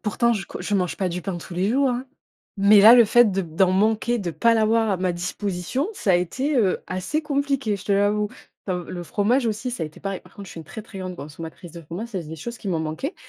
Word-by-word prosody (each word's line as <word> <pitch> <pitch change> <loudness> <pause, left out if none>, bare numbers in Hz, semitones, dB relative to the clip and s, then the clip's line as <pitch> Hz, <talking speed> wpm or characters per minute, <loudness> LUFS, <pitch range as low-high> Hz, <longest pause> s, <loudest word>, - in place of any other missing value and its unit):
Pourtant, 235 +2 +1
je 200 -5 -3
co - - -8
je 195 +3 -2
mange 180 -4 0
pas 185 +2 -1
du 180 +1 -4
pain 190 0 -3
tous 175 - -9
les 185 +3 0
jours, 270 +3 +3
hein, 250 +2 -3 0.5
mais 200 +1 +6
là, 220 +4 +10
le 240 -1 +8
fait 235 +1 +5
de 195 0 0
d'en 175 +2 +1
manquer, 220 +4 +2
de 185 -5 -3
pas 230 +7 +3
l'avoir 225 0 +2
à 195 - +1
ma 180 0 0
disposition, 180 - -3
ça 200 - 0
a - - +5
été, 255 - 0
heu, 200 -6 +2
assez 185 +12 -2
compliqué, 280 -7 0
je 195 - -12
te 200 - 0
l'avoue. 205 +1 +2 0.4
Comme 180 -3 -3
le 175 - -5
fromage 230 +8 +1
aussi, 225 +3 -2
ça 235 - -4
a - - -1
été 155 - -13
pareil. 195 -1 -4
Par - - -21
contre, 200 -2 -9
je - - -11
suis - - -9
une 160 - -8
très, 220 - -8
très 205 -2 -11
grande 185 -1 -5
consommatrice 160 +2 -9
de 170 - -9
fromage, 175 +9 -6
ça, 195 -6 -4
c'est 155 - -12
des 160 - -7
choses 235 +9 -7
qui 205 - -6
m'ont 170 -3 0
manquées. 160 - -4
200 Hz, 270 wpm, -23 LUFS, 180-230 Hz, 0.5 s, là